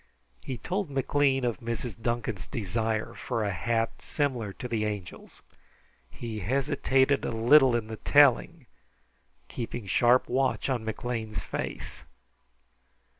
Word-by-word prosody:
He 130 Hz, -, -5 dB
told 185 Hz, -, -3 dB
McLean 135 Hz, -1 st, +1 dB
of 120 Hz, -2 st, -1 dB
Mrs. 115 Hz, -1 st, -5 dB
Duncan's 115 Hz, -4 st, -2 dB
desire 110 Hz, -1 st, -2 dB
for 115 Hz, -, -3 dB
a 100 Hz, -, 0 dB
hat 115 Hz, +5 st, -1 dB
similar 125 Hz, -8 st, -2 dB
to 125 Hz, -, -6 dB
the 115 Hz, -3 st, -1 dB
Angel's. 105 Hz, -5 st, -6 dB, 0.7 s
He 110 Hz, -, -6 dB
hesitated 135 Hz, +4 st, +1 dB
a -, -, -1 dB
little 125 Hz, +3 st, +5 dB
in 115 Hz, -2 st, -1 dB
the 110 Hz, 0 st, -7 dB
telling, 145 Hz, +3 st, +4 dB, 0.8 s
keeping 120 Hz, -2 st, -5 dB
sharp 120 Hz, +6 st, +3 dB
watch 130 Hz, +2 st, 0 dB
on 125 Hz, -4 st, -1 dB
McLean's 110 Hz, 0 st, -4 dB
face. -, -, -6 dB
120 Hz, 125 wpm, -28 LUFS, 110-135 Hz, 0.8 s, little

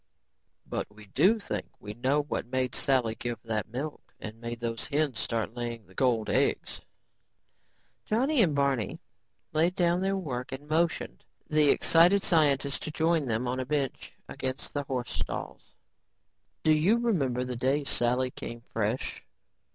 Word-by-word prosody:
"But -, -, -3 dB
we 105 Hz, 0 st, -14 dB
do 190 Hz, -, +4 dB
think 205 Hz, -, -4 dB
we 105 Hz, -, -7 dB
know 130 Hz, +6 st, +1 dB
what 145 Hz, -, -3 dB
made 130 Hz, 0 st, -1 dB
Sally 125 Hz, -5 st, +2 dB
give 120 Hz, +1 st, -4 dB
that 110 Hz, -3 st, -2 dB
milk 140 Hz, +6 st, -4 dB, 0.2 s
and 110 Hz, +1 st, -8 dB
made 115 Hz, 0 st, -5 dB
those 115 Hz, -1 st, -3 dB
hens 145 Hz, -5 st, 0 dB
start 115 Hz, -1 st, -2 dB
laying 120 Hz, -2 st, -4 dB
the 95 Hz, -, -19 dB
gold 115 Hz, -2 st, +2 dB
eggs." -, -, 0 dB, 1.2 s
Johnny 260 Hz, +5 st, +2 dB
and 165 Hz, -8 st, +3 dB
Barney 135 Hz, -7 st, 0 dB, 0.5 s
laid 165 Hz, +4 st, +2 dB
down 175 Hz, 0 st, +2 dB
their 195 Hz, +1 st, +1 dB
work 130 Hz, -9 st, -4 dB
and 140 Hz, +2 st, -7 dB
motioned 160 Hz, -, 0 dB, 0.2 s
the 150 Hz, -1 st, +4 dB
excited 175 Hz, +7 st, +5 dB
scientist 145 Hz, -4 st, +2 dB
to -, -, -4 dB
join 160 Hz, -1 st, +1 dB
them 115 Hz, +2 st, 0 dB
on 125 Hz, +1 st, -1 dB
a 130 Hz, -, -2 dB
bench 140 Hz, -3 st, -2 dB, 0.2 s
against 130 Hz, +1 st, -4 dB
the 145 Hz, -, 0 dB
horse 125 Hz, -3 st, -3 dB
stalls. -, -, -5 dB, 0.9 s
"Do 155 Hz, -, +4 dB
you 165 Hz, +9 st, +4 dB
remember 145 Hz, -, +1 dB
the 125 Hz, -1 st, -4 dB
day 135 Hz, +4 st, +1 dB
Sally 125 Hz, -1 st, +1 dB
came 120 Hz, -1 st, -7 dB
fresh?" 115 Hz, +3 st, -1 dB
135 Hz, 155 wpm, -29 LUFS, 120-155 Hz, 1.2 s, excited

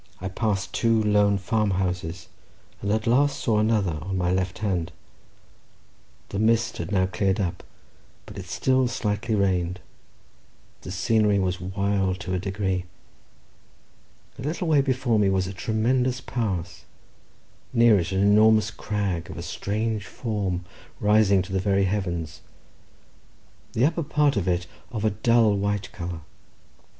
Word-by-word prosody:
I 95 Hz, -, -4 dB
passed 100 Hz, -1 st, -2 dB
two 115 Hz, -1 st, +2 dB
lone 105 Hz, -1 st, +3 dB
farm 105 Hz, +2 st, 0 dB
houses, 90 Hz, -3 st, -2 dB, 0.5 s
and 100 Hz, -, -1 dB
at 110 Hz, 0 st, 0 dB
last 140 Hz, +4 st, +3 dB
saw 110 Hz, -3 st, +1 dB
another 105 Hz, -7 st, +1 dB
on 95 Hz, +3 st, -3 dB
my 90 Hz, -1 st, +1 dB
left 95 Hz, 0 st, -1 dB
hand—the 100 Hz, 0 st, -8 dB
mist 115 Hz, +1 st, +2 dB
had 85 Hz, +3 st, -5 dB
now 95 Hz, -2 st, +3 dB
cleared 95 Hz, +1 st, 0 dB
up, 90 Hz, -3 st, -2 dB, 0.6 s
but -, -, -11 dB
it -, -, -8 dB
still 130 Hz, -1 st, +1 dB
slightly 110 Hz, -1 st, -1 dB
rained—the 90 Hz, -2 st, -5 dB
scenery 105 Hz, +3 st, +2 dB
was 90 Hz, -2 st, -1 dB
wild 95 Hz, 0 st, -1 dB
to 90 Hz, +2 st, -4 dB
a 90 Hz, -, 0 dB
degree—a 95 Hz, -1 st, -1 dB, 1.6 s
little 160 Hz, +5 st, -2 dB
way 150 Hz, -3 st, +4 dB
before 130 Hz, -4 st, +1 dB
me 100 Hz, -2 st, +3 dB
was 95 Hz, -1 st, +1 dB
a 95 Hz, -, -5 dB
tremendous 125 Hz, +5 st, 0 dB
pass, 95 Hz, -8 st, -3 dB, 0.9 s
near 115 Hz, -3 st, +5 dB
it 85 Hz, +2 st, -3 dB
an 95 Hz, 0 st, +1 dB
enormous 105 Hz, +1 st, +5 dB
crag, 100 Hz, -7 st, -3 dB
of -, -, -8 dB
a 85 Hz, -, -5 dB
strange 105 Hz, +3 st, -2 dB
form, 100 Hz, -6 st, -3 dB, 0.3 s
rising 105 Hz, -2 st, +4 dB
to 95 Hz, +1 st, -8 dB
the 95 Hz, -, +1 dB
very 100 Hz, 0 st, +2 dB
heavens, 85 Hz, -5 st, -2 dB, 1.3 s
the 120 Hz, -, +3 dB
upper 165 Hz, +3 st, +1 dB
part 150 Hz, -2 st, +2 dB
of 100 Hz, -3 st, -1 dB
it 90 Hz, 0 st, 0 dB, 0.3 s
of 110 Hz, -3 st, -3 dB
a 110 Hz, -, +3 dB
dull 110 Hz, 0 st, +3 dB
white 100 Hz, 0 st, -2 dB
colour. 85 Hz, -1 st, -6 dB
100 Hz, 140 wpm, -25 LUFS, 95-110 Hz, 1.6 s, near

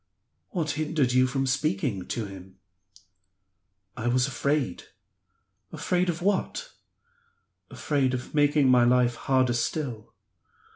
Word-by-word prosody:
"What 160 Hz, -5 st, -2 dB
hindered 150 Hz, -3 st, 0 dB
you 130 Hz, +1 st, +4 dB
from 135 Hz, +1 st, -1 dB
speaking 125 Hz, -7 st, -1 dB
to 115 Hz, -, -3 dB
him?" 95 Hz, -1 st, -11 dB, 1.4 s
"I 115 Hz, -, -3 dB
was 125 Hz, +1 st, +3 dB
afraid." 135 Hz, -4 st, -1 dB, 0.9 s
"Afraid 180 Hz, 0 st, 0 dB
of 170 Hz, 0 st, -3 dB
what?" 205 Hz, -, -1 dB, 1.0 s
"Afraid 135 Hz, -4 st, 0 dB
of 125 Hz, -, -7 dB
making 145 Hz, -1 st, +3 dB
my 130 Hz, -1 st, +6 dB
hard 120 Hz, 0 st, +4 dB
life 125 Hz, -1 st, +3 dB
harder 130 Hz, -2 st, +1 dB
still." 120 Hz, -2 st, -3 dB
130 Hz, 115 wpm, -26 LUFS, 120-150 Hz, 1.4 s, my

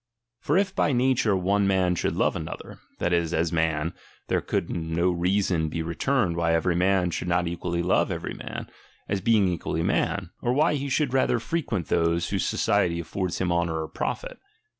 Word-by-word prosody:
For 150 Hz, -, +1 dB
if 195 Hz, -1 st, +1 dB
by 145 Hz, -, +2 dB
nature 125 Hz, -4 st, +2 dB
one 100 Hz, +2 st, +2 dB
man 95 Hz, -2 st, +2 dB
should 85 Hz, -, -1 dB
love -, -, +1 dB
another, -, -, -7 dB, 0.2 s
that 85 Hz, -, 0 dB
is, 85 Hz, -1 st, +1 dB
as 80 Hz, +1 st, +1 dB
man, 80 Hz, -1 st, 0 dB, 0.4 s
there -, -, +2 dB
could -, -, -1 dB
no 85 Hz, +2 st, 0 dB
reason 90 Hz, -2 st, +1 dB
be 80 Hz, +1 st, -3 dB
returned 85 Hz, +3 st, 0 dB
why 85 Hz, -1 st, +2 dB
every 85 Hz, +1 st, +1 dB
man 90 Hz, 0 st, +2 dB
should 90 Hz, -, -3 dB
not 90 Hz, 0 st, +1 dB
equally 85 Hz, 0 st, -2 dB
love 90 Hz, -, +2 dB
every -, -, -4 dB
man, -, -, -7 dB, 0.4 s
as 100 Hz, -1 st, -1 dB
being 110 Hz, -3 st, +4 dB
equally 80 Hz, -2 st, -2 dB
man; 95 Hz, 0 st, 0 dB
or 120 Hz, -, +1 dB
why 150 Hz, +4 st, +3 dB
he 140 Hz, -1 st, -2 dB
should 135 Hz, -1 st, +1 dB
rather 130 Hz, -2 st, +3 dB
frequent 115 Hz, -, -2 dB
those, 85 Hz, 0 st, +1 dB
whose -, -, 0 dB
society 85 Hz, -1 st, +1 dB
aflFords 90 Hz, +2 st, -3 dB
him 90 Hz, -1 st, 0 dB
honour 85 Hz, -2 st, 0 dB
or -, -, -5 dB
profit. -, -, -4 dB
90 Hz, 185 wpm, -26 LUFS, 85-105 Hz, 0.4 s, being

